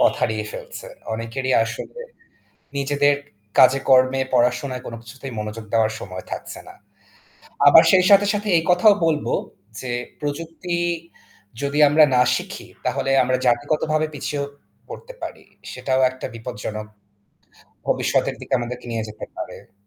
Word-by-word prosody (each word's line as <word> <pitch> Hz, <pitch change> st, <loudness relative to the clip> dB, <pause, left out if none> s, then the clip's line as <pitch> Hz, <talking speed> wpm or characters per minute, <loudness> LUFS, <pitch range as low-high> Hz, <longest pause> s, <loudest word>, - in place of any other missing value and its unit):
পথ -, -, +5 dB
হারিয়ে 110 Hz, -1 st, 0 dB
ফেলছে। -, -, -8 dB, 0.3 s
অনেকেরই 125 Hz, +4 st, -3 dB
আসলে 115 Hz, -, -7 dB, 0.8 s
নিজেদের 145 Hz, +1 st, +2 dB, 0.4 s
কাজে 135 Hz, +1 st, +7 dB
কর্মে 130 Hz, 0 st, +5 dB
পড়াশোনায় 125 Hz, +1 st, +1 dB
কোন 115 Hz, -, -6 dB
কিছুতেই 130 Hz, +3 st, -9 dB
মনোযোগ 105 Hz, +1 st, -5 dB
দেওয়ার 110 Hz, -1 st, +3 dB
সময় 95 Hz, -2 st, -7 dB
থাকছে -, -, -6 dB
না। -, -, -12 dB, 0.9 s
আবার -, -, +9 dB
সেই 185 Hz, -1 st, +5 dB
সাথে, 200 Hz, 0 st, +7 dB
সাথে, 205 Hz, +1 st, -3 dB
এই 165 Hz, -, +1 dB
কথাও 180 Hz, +4 st, +6 dB
বলবো 155 Hz, -2 st, 0 dB, 0.5 s
যে 125 Hz, -, -4 dB, 0.3 s
প্রযুক্তি 165 Hz, +4 st, -4 dB, 0.9 s
যদি 140 Hz, +1 st, -1 dB
আমরা 155 Hz, +2 st, +6 dB
না 125 Hz, -, +5 dB
শিখি -, -, -6 dB, 0.2 s
তাহলে 135 Hz, -, 0 dB
আমরা 130 Hz, +1 st, +1 dB
জাতিগতভাবে 155 Hz, +5 st, +1 dB
পিছিয়েও 145 Hz, 0 st, -3 dB, 0.4 s
পড়তে -, -, -9 dB
পারি। -, -, -7 dB, 0.3 s
সেটাও 130 Hz, -1 st, 0 dB
একটা 130 Hz, -, -8 dB
বিপজ্জনক 110 Hz, -2 st, -6 dB, 1.0 s
ভবিষ্যতের -, -, +1 dB
দিকে -, -, -10 dB
আমাদেরকে 120 Hz, +1 st, -6 dB
নিয়ে 115 Hz, -1 st, -2 dB
যেতে 105 Hz, 0 st, -8 dB
পারে। -, -, -8 dB
130 Hz, 135 wpm, -22 LUFS, 115-150 Hz, 1.0 s, আবার